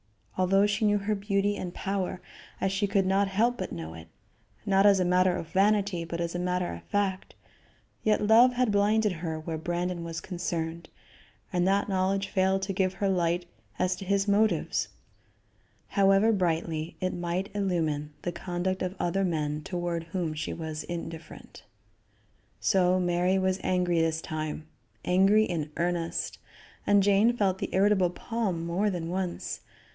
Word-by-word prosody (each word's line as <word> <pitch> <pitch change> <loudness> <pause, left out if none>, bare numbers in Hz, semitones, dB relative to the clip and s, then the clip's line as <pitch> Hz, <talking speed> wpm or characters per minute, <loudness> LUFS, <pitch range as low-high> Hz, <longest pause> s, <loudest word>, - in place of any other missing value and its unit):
Although 195 +2 +3
she 210 +2 0
knew 205 0 +4
her 205 +1 -1
beauty 200 0 0
and 180 -3 -5
power, 190 -2 -2 0.4
as 190 - 0
she 200 +1 0
could 195 -1 +2
not 195 +1 +2
help 230 +5 +1
but - - -4
know 80 -1 -6
it 80 0 -11 0.6
not 195 0 +4
as 200 -1 +5
a 180 - +2
matter 180 0 +3
of 165 - -6
vanity, 200 -2 +2
but 170 0 -5
as 170 0 -2
a 175 - -2
matter 180 - -1
of 85 - -8
fact 195 - -2 0.7
yet 210 -1 +2
love 235 +4 +6
had 250 -2 +1
blinded 210 +1 +3
her 160 -2 -4
where 160 0 -4
Brandon 175 +1 -2
was 165 -1 -5
concerned, 170 -2 -4 0.6
and 180 0 +2
that 200 +1 +2
knowledge 195 0 0
failed 190 0 +1
to 195 0 -2
give 185 0 +1
her 200 +1 0
light 175 -2 +1 0.3
as 185 0 +1
to 195 - -7
his 200 +1 +1
motives, 205 -4 +2 1.0
however 195 +2 +4
brightly 165 -4 -1
it 185 0 -1
might 175 +2 -3
illumine 160 -7 -1
the 175 - -1
conduct 180 +2 -3
of 185 +1 -2
other 190 +3 0
men 150 -4 -1
toward 175 -1 -3
whom 170 -2 -3
she 155 - -4
was 160 -2 -5
indifferent. 165 -1 -8 1.0
So 185 -2 +3
Mary 180 +1 +2
was 190 0 +1
angry 180 -2 +1
this 160 -1 +1
time; 155 -1 -4 0.4
angry 195 +4 +4
in 165 -7 -2
earnest, 170 -1 -2 0.5
and 205 -1 +5
Jane 205 +4 +4
felt 190 -3 +1
the - - -3
irritable 195 -1 +3
palm 190 -3 -3
more 185 +5 +1
than 170 -4 -3
once. 185 -1 -3
185 Hz, 160 wpm, -28 LUFS, 170-200 Hz, 1.0 s, love